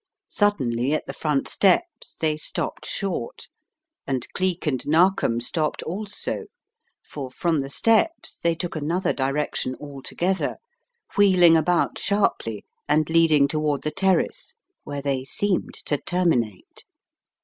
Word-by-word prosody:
Suddenly 135 - +1
at 155 - -1
the - - -6
front 150 -3 -1
steps 275 - +1
they 155 -1 +1
stopped 155 - -4
short, 185 - -4 0.6
and 130 -2 -1
Cleek 185 -2 -1
and 130 -5 0
Narkom 165 -6 +3
stopped 150 +6 -1
also, 205 +4 -4 0.6
for 135 -3 -7
from 160 +4 0
the 135 0 -3
steps 230 - +1
they 170 0 +1
took 175 +1 -5
another 170 +5 0
direction 135 -1 -1
altogether, 150 +6 -2 0.6
wheeling 185 -5 +6
about 170 +2 +1
sharply 195 - 0 0.2
and 155 +1 +2
leading 160 -4 +5
toward 150 -1 -1
the 150 - -1
terrace 195 - 0 0.3
where 145 -1 -5
they 135 -2 -1
seemed 190 +7 -1
to 145 - 0
terminate. 140 - -1
155 Hz, 125 wpm, -24 LUFS, 140-185 Hz, 0.6 s, wheeling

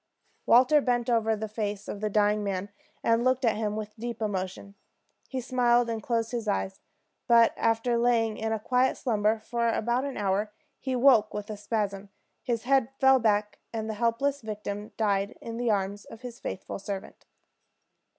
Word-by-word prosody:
Walter 260 +5 +6
bent 245 -2 0
over 225 -1 +2
the 220 +1 -4
face 210 -2 -4
of 205 - -6
the 215 - 0
dying 210 0 +2
man, 200 0 -3 0.3
and 230 +1 +3
looked 255 0 +2
at 225 - +3
him 210 -1 -2
with 215 -1 -6
deep 235 0 -5
emotion. 200 -2 -3 0.6
He 260 - -3
smiled 240 -2 +2
and 225 -1 -3
closed 230 +1 -1
his 235 -3 -3
eyes; 195 -1 -1 0.5
but 235 -1 +6
after 230 +1 +1
lying 230 -2 +2
in 220 +1 -3
a 220 - +1
quiet 250 +4 +1
slumber 215 -3 +1
for 235 +1 -1
about 240 +3 0
an 280 -1 -4
hour, 205 +1 0 0.3
he 265 - -3
awoke 250 -4 +4
with 210 +1 -5
a - - -4
spasm; 205 -1 -3 0.3
his 235 -3 -2
head 265 -1 +3
fell 265 -1 +6
back, 210 -2 +1
and 220 -1 -3
the 220 - -2
hapless 270 +5 +1
victim 210 -1 -5
died 200 -2 0
in 230 0 -6
the 240 -1 0
arms 200 -1 -1
of 225 - -12
his 245 -2 -8
faithful 190 - -5
servant. 195 0 -7
225 Hz, 180 wpm, -28 LUFS, 210-240 Hz, 0.6 s, Walter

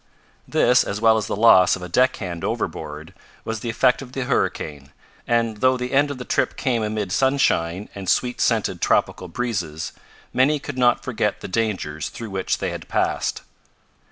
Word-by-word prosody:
This, 125 0 +4
as 100 - -4
well 110 0 +5
as 110 - -1
the - - -2
loss 100 -4 +6
of 95 - -9
a - - -5
deckhand 95 -5 0
overboard, 75 +4 -4 0.3
was 110 0 -3
the 120 - -4
effect 125 +3 +2
of 130 -1 -10
the 135 - -2
hurricane, 75 - -2 0.4
and 115 -2 +1
though 130 +3 +3
the 125 0 -4
end 145 +2 +3
of 140 - -5
the 125 - -7
trip - - 0
came 120 -4 0
amid 105 -3 -2
sunshine 105 -8 +1
and 95 -2 -5
sweet 125 -1 +1
scented - - +1
tropical 90 - +1
breezes, 85 -7 -3 0.4
many 135 +4 +3
could 140 -2 -6
not 120 -1 +3
forget 110 -5 -1
the - - -6
dangers 95 -8 -2
through 115 -3 -8
which 95 -1 -1
they - - -2
had - - -7
passed. - - -1
110 Hz, 180 wpm, -22 LUFS, 90-125 Hz, 0.4 s, loss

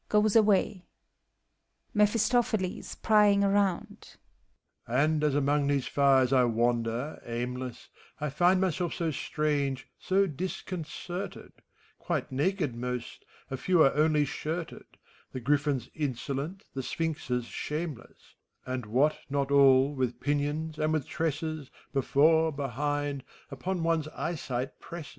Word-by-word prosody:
[Goes 210 0 +3
avxfky, 205 -3 +3 1.1
MEPHISTOPHELES 220 -2 +1
{prying 210 -2 +5
around), 200 -2 0 0.7
And 150 +6 +2
as 150 -2 +2
among 145 0 +2
these 140 -2 +1
fires 135 -2 +3
I 130 -1 +5
wander, 120 +3 0
aimless, 125 +1 -5 0.3
I 150 -1 -2
find 175 +6 +3
myself 180 -2 0
so 165 -2 -1
strange, 145 -3 -1
so 195 +1 +2
disconcerted: 180 +2 -5 0.5
Quite - - -2
naked 150 +1 0
most, 125 0 -5 0.3
a 135 - -2
few 170 +4 +4
are 135 - +4
only 150 -1 +3
shirted; 160 +4 -5 0.5
The 130 - -3
Griffins 140 -1 0
insolent, 145 +5 -3
the 135 - -3
Sphinxes 140 -5 -2
shameless, 150 0 -6 0.3
And 130 -3 -4
what 140 +8 +2
not 140 0 -1
all, 135 0 +6
with 130 -3 -2
pinions 145 +2 -1
and 155 0 +1
with 155 -4 0
tresses, 155 -2 -3 0.2
Before, 160 +4 +3
behind, 145 0 -2 0.3
upon 175 +6 -3
one's 165 -2 +1
eyesight 135 -6 -4
presses! 170 -4 -8
150 Hz, 115 wpm, -29 LUFS, 135-170 Hz, 1.1 s, all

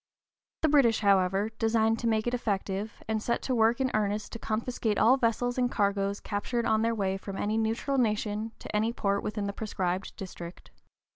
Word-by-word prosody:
The - - +5
British, 270 -8 +4
however, 195 +1 +3
designed 225 0 +2
to 235 - -1
make 220 -1 +1
it 240 - -1
effective, 205 -3 -2
and 220 -1 -1
set 235 - -1
to 260 - -1
work 230 +1 +3
in 260 -1 +1
earnest 210 0 -1
to 230 - -6
confiscate 220 -1 -1
all 240 +4 +6
vessels 245 0 0
and 245 -1 +1
cargoes 200 -1 0
captured 235 +3 -2
on 220 0 +2
their 230 0 +1
way 195 -2 0
from 195 0 -7
any 210 +1 -1
neutral 225 +5 0
nation 215 -1 0
to - - -7
any 220 +2 +2
port 200 -3 0
within 210 -1 -3
the 200 - -3
proscribed 190 -3 -3
district. 175 -3 -9
220 Hz, 190 wpm, -29 LUFS, 200-230 Hz, -, all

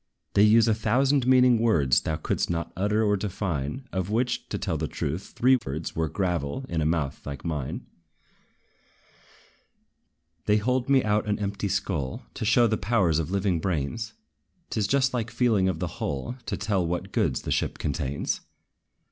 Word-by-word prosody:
They 100 - +4
use 110 +2 +6
a 110 - +4
thousand 130 +4 +2
meaning 125 -2 +5
words 80 - +3
Thou 80 - -2
couldst - - -1
not 85 0 -2
utter 105 +4 +1
or 105 -1 +3
define, 95 - -3
Of 95 0 -2
which, 120 +3 -1
to - - -2
tell - - -2
the - - -2
truth, 80 +7 -4
three 130 +2 +5
thirds 75 - -5
Were 80 -1 0
gravel, 90 - -2
in 80 -2 -1
a 75 - +2
mouth 80 -4 -1
like 70 -2 -7
thine. 75 -5 -3 2.6
They 105 0 +4
hold 125 +4 0
me 135 -2 +5
out 105 0 +1
an 105 - +1
empty 100 0 -2
skull, 90 -8 -2
To - - -4
show 120 +3 +5
the 110 -1 +1
powers 95 -8 +2
of 80 - -2
living 95 -2 +1
brains: 95 +7 -2 0.6
'T - - -1
is 100 - +1
just 135 +1 +2
like 115 -3 -1
feeling 110 -7 +2
of 90 - -2
the - - -2 0.2
hull, 70 - -3
To - - -2
tell 100 -3 0
what 85 +1 -3
goods - - 0
the - - -3
ship - - 0
contains. 70 -1 -2
100 Hz, 175 wpm, -26 LUFS, 80-115 Hz, 2.6 s, use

